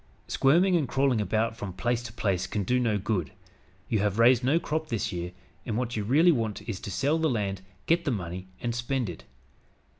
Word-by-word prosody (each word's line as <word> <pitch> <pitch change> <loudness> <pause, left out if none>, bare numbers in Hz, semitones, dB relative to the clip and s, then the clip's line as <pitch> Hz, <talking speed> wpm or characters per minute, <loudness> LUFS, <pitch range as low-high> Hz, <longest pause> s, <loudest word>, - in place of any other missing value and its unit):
Squirming 175 +7 +4
and 155 -6 +1
crawling 135 -3 +2
about 110 +3 0
from 100 -5 -6
place 120 +5 -1
to 120 -2 -8
place 100 -5 -1
can 100 +2 -2
do 125 +7 +1
no 115 -4 +1
good. 100 -6 -2 0.5
You 110 - +1
have 105 0 0
raised 120 +1 +5
no 145 +6 +3
crop 155 -1 -2
this 115 -5 -2
year, 90 0 -4 0.3
and 110 - -3
what 125 0 -2
you 105 - -1
really 150 - +5
want 115 -8 -2
is 110 -5 -3
to - - -7
sell 145 - +1
the 160 -1 +2
land, 100 -6 -1 0.2
get 170 +1 +2
the 150 - -1
money 95 -5 -4
and 120 -1 -1
spend 120 -3 -1
it. 80 - -12
115 Hz, 210 wpm, -28 LUFS, 100-135 Hz, 0.5 s, raised